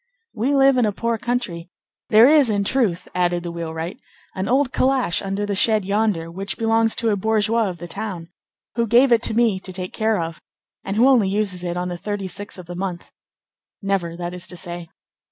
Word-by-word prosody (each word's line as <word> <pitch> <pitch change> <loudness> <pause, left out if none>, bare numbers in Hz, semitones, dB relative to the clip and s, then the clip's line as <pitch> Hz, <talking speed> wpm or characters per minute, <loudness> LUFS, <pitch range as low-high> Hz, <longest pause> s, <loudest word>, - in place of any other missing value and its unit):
"We 245 +5 0
live 270 -1 +5
in 240 -3 +3
a - - +1
poor 230 +2 -2
country. 220 -9 -3 0.4
There 225 +1 +7
is, 290 -4 +5
in 205 -2 +1
truth," 200 -6 +1
added 175 -1 0
the 170 - -4
wheelwright, 165 +1 -5 0.3
"an 190 0 -3
old 260 +1 +2
calash 260 -8 +1
under 195 +1 -2
the 205 - -2
shed 215 +1 +2
yonder, 200 -5 0
which 195 +3 -5
belongs 225 0 +2
to 230 -1 +1
a - - +2
bourgeois 220 +1 +1
of 180 - -6
the 175 +1 -8
town, 185 -4 -6 0.4
who 235 -1 0
gave 245 +4 +5
it 230 -1 +5
to 220 - 0
me 225 -5 +2
to 185 - -8
take 185 0 -5
care 220 -2 +1
of, 165 -1 -5 0.4
and 195 - -3
who 235 +4 +5
only 240 -8 +4
uses 195 -3 -1
it 175 0 -3
on 180 0 -2
the 175 -1 -5
thirty 205 -1 -4
sixth 205 +2 -6
of 180 - -10
the 175 - -8
month—never, 180 0 -6
that 175 0 -5
is 180 0 -4
to 180 - -7
say. 175 -2 -6
200 Hz, 210 wpm, -21 LUFS, 175-225 Hz, 0.4 s, There